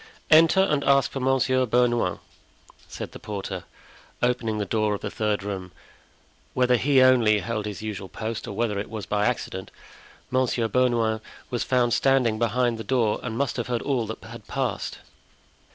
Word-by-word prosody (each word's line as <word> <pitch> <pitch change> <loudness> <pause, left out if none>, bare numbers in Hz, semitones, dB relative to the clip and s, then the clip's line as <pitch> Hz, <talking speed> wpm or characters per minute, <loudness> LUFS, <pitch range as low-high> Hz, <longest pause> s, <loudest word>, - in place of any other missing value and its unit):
"Enter, 165 +4 +7
and 150 -7 +1
ask 140 -1 +3
for 135 - -4
Monsieur 130 0 +2
Bernouin," 120 -5 +2 0.7
said - - -7
the - - -10
porter, 105 -2 -5 0.6
opening 120 -3 0
the 105 - -1
door 105 +1 0
of - - -8
the 105 - -4
third 105 -2 -1
room. 95 -3 -5 0.8
Whether 125 0 +4
he 135 +1 +4
only 120 -5 +5
held 105 +2 -3
his 105 -1 -6
usual 100 -3 -5
post 110 0 -5
or - - -5
whether 105 -2 0
it 100 - -5
was 110 -3 -6
by 105 +1 +1
accident, 115 -6 -3 0.6
Monsieur 125 -2 +1
Bernouin 115 -3 +1 0.3
was 120 - -1
found 125 -2 +2
standing 125 -5 +2
behind 120 0 +1
the - - -4
door 115 -5 +1
and 115 -2 -4
must 140 -3 -1
have 120 - -2
heard 120 -2 -2
all 125 -6 0
that 110 - -7
had - - -11
passed. - - -3
115 Hz, 170 wpm, -25 LUFS, 105-130 Hz, 0.8 s, Enter